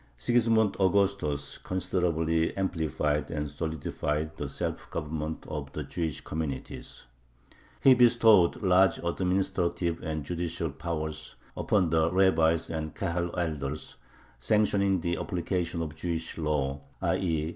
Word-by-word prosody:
Sigismund 110 Hz, -, +3 dB
Augustus 95 Hz, -7 st, +1 dB
considerably 85 Hz, -3 st, 0 dB
amplified 80 Hz, -5 st, 0 dB
and 75 Hz, -2 st, -3 dB
solidified 75 Hz, 0 st, -3 dB
the -, -, -4 dB
self -, -, -4 dB
government 80 Hz, 0 st, -4 dB
of -, -, -5 dB
the -, -, -3 dB
Jewish 80 Hz, -5 st, -3 dB
communities. 75 Hz, -6 st, -5 dB, 0.8 s
He 135 Hz, -, +8 dB
bestowed 115 Hz, -7 st, +5 dB
large 95 Hz, -1 st, +5 dB
administrative 85 Hz, -1 st, 0 dB
and 80 Hz, -3 st, -3 dB
judicial 85 Hz, 0 st, -3 dB
powers 80 Hz, +1 st, -4 dB, 0.2 s
upon 90 Hz, -6 st, +1 dB
the 80 Hz, 0 st, +3 dB
rabbis 85 Hz, -4 st, +3 dB
and 80 Hz, -1 st, -4 dB
Kahal 85 Hz, -1 st, -2 dB
elders, 75 Hz, -4 st, -3 dB, 0.4 s
sanctioning 100 Hz, -, +2 dB
the 85 Hz, +1 st, -1 dB
application 85 Hz, -1 st, -2 dB
of 80 Hz, -1 st, -6 dB
"Jewish 85 Hz, -1 st, -3 dB
law" 75 Hz, -3 st, -1 dB, 0.2 s
(_i. -, -, +1 dB
e. 80 Hz, -3 st, 0 dB
85 Hz, 115 wpm, -29 LUFS, 80-95 Hz, 0.8 s, He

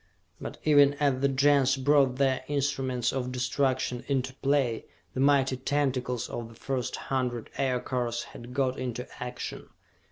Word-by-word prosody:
But -, -, -6 dB
even 145 Hz, -2 st, +6 dB
as 140 Hz, -3 st, +1 dB
the 140 Hz, -, +4 dB
Gens 140 Hz, 0 st, +3 dB
brought 135 Hz, -1 st, +3 dB
their 130 Hz, -1 st, +1 dB
instruments 135 Hz, -4 st, 0 dB
of 125 Hz, -1 st, -2 dB
destruction 125 Hz, 0 st, 0 dB
into 130 Hz, -2 st, 0 dB
play, 135 Hz, -4 st, 0 dB, 0.3 s
the -, -, -4 dB
mighty 135 Hz, -1 st, +3 dB
tentacles 130 Hz, -3 st, -1 dB
of 115 Hz, -1 st, -5 dB
the 115 Hz, -, -14 dB
first 130 Hz, +1 st, -3 dB
hundred 125 Hz, -4 st, -2 dB
Aircars 125 Hz, -2 st, -1 dB
had 120 Hz, +1 st, -11 dB
got 130 Hz, -1 st, 0 dB
into 125 Hz, -1 st, -4 dB
action. 125 Hz, 0 st, -6 dB
130 Hz, 140 wpm, -28 LUFS, 125-140 Hz, 0.3 s, even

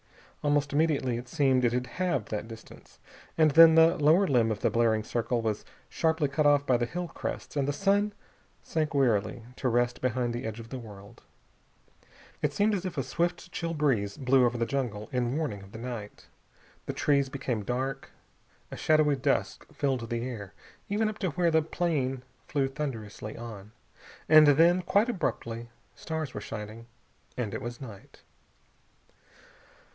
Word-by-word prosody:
Almost 145 Hz, -1 st, +1 dB
immediately, 145 Hz, -5 st, +1 dB
it 120 Hz, 0 st, -10 dB
seemed, 135 Hz, -4 st, +2 dB
it 120 Hz, -, +3 dB
had 125 Hz, 0 st, 0 dB
halved 170 Hz, -, -2 dB
that 105 Hz, 0 st, -4 dB
distance. 115 Hz, -1 st, -13 dB, 0.4 s
And 155 Hz, -2 st, +5 dB
then 160 Hz, +2 st, +8 dB
the 165 Hz, +1 st, +6 dB
lower 155 Hz, +6 st, +4 dB
limb 120 Hz, -8 st, +2 dB
of 105 Hz, -, -4 dB
the -, -, +2 dB
blaring 115 Hz, -2 st, +2 dB
circle 120 Hz, +1 st, -1 dB
was 110 Hz, -2 st, -2 dB, 0.2 s
sharply 160 Hz, -2 st, +1 dB
cut 145 Hz, +2 st, +1 dB
off 145 Hz, -1 st, +4 dB
by 130 Hz, -3 st, +3 dB
the 120 Hz, 0 st, -1 dB
hill 175 Hz, +7 st, -4 dB
crests -, -, -6 dB
and 140 Hz, -2 st, 0 dB
the -, -, +1 dB
sun 200 Hz, +5 st, +1 dB, 0.5 s
sank 155 Hz, -2 st, -2 dB
wearily 115 Hz, -3 st, +1 dB
to 130 Hz, -, 0 dB
rest 120 Hz, +1 st, 0 dB
behind 125 Hz, -1 st, 0 dB
the 120 Hz, -, -4 dB
edge 110 Hz, 0 st, -5 dB
of 115 Hz, 0 st, -10 dB
the 130 Hz, -, -5 dB
world. 105 Hz, 0 st, -12 dB, 1.2 s
It 150 Hz, -, +1 dB
seemed 210 Hz, +4 st, +2 dB
as 190 Hz, -3 st, -1 dB
if 185 Hz, -, -7 dB
a -, -, 0 dB
swift 175 Hz, +1 st, -2 dB
chill 165 Hz, -1 st, -3 dB
breeze 115 Hz, -10 st, 0 dB
blew 130 Hz, -1 st, +3 dB
over 120 Hz, 0 st, +1 dB
the 115 Hz, -, 0 dB
jungle, 115 Hz, -4 st, -3 dB
in 125 Hz, +1 st, 0 dB
warning 140 Hz, -11 st, -3 dB
of 95 Hz, 0 st, -14 dB
the -, -, -9 dB
night. 115 Hz, -3 st, -7 dB, 0.6 s
The -, -, -2 dB
trees 140 Hz, -2 st, +2 dB
became 130 Hz, -5 st, -3 dB
dark. 130 Hz, +5 st, -3 dB, 0.6 s
A -, -, -5 dB
shadowy 155 Hz, -2 st, +3 dB
dusk 135 Hz, +1 st, -1 dB
filled 130 Hz, -5 st, -2 dB
the 120 Hz, +1 st, -2 dB
air 105 Hz, -6 st, -7 dB, 0.3 s
even 215 Hz, +2 st, +1 dB
up 215 Hz, -, -8 dB
to 190 Hz, -, 0 dB
where 170 Hz, +2 st, +1 dB
the 160 Hz, 0 st, +4 dB
plane 150 Hz, -6 st, -1 dB, 0.2 s
flew 140 Hz, -2 st, 0 dB
thunderously 120 Hz, -7 st, -6 dB
on. 110 Hz, -3 st, -9 dB, 0.6 s
And 155 Hz, -1 st, +8 dB
then, 165 Hz, +5 st, +5 dB
quite 205 Hz, +6 st, +2 dB
abruptly, 120 Hz, -, -3 dB, 0.2 s
stars 160 Hz, -4 st, -5 dB
were 105 Hz, -, -5 dB
shining 110 Hz, +2 st, -7 dB, 0.5 s
and 115 Hz, -5 st, -3 dB
it -, -, -4 dB
was 120 Hz, 0 st, -6 dB
night. 110 Hz, -7 st, -12 dB
130 Hz, 170 wpm, -28 LUFS, 115-155 Hz, 1.2 s, then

